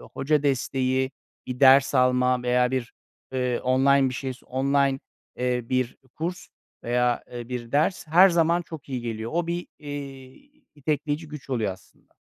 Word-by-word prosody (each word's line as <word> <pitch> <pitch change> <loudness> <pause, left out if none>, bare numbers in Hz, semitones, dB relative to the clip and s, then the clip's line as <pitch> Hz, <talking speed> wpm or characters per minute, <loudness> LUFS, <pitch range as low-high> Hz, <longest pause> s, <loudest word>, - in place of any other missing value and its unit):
hoca 145 +2 -1
desteği, 130 -1 0 0.4
bir 125 +1 -6
ders 135 +1 +6
alma 125 -1 +3
veya 125 0 +2
bir, 130 -2 -3 0.4
eee, 125 -2 -1
online 135 +1 +3
bir 130 - -5
şey 130 +1 -3
s 125 - -18
online, 135 +1 +1 0.4
eee, 125 0 0
bir 130 -1 0 0.2
kurs 175 +3 -4 0.4
veya, 120 0 +1
eee, 120 0 -7
bir 120 -1 -6
ders 160 +4 +1
her 180 +5 +7
zaman 170 0 +2
çok 160 -4 -10
iyi 130 -2 -3
geliyor. 115 -1 -4
O 170 -1 0
bir, 175 +1 -3
iii, 145 - -10
itekleyici 150 +1 -2
güç 145 -2 -10
oluyor 110 -7 0
aslında. 95 -2 -20
130 Hz, 155 wpm, -25 LUFS, 125-150 Hz, 0.4 s, her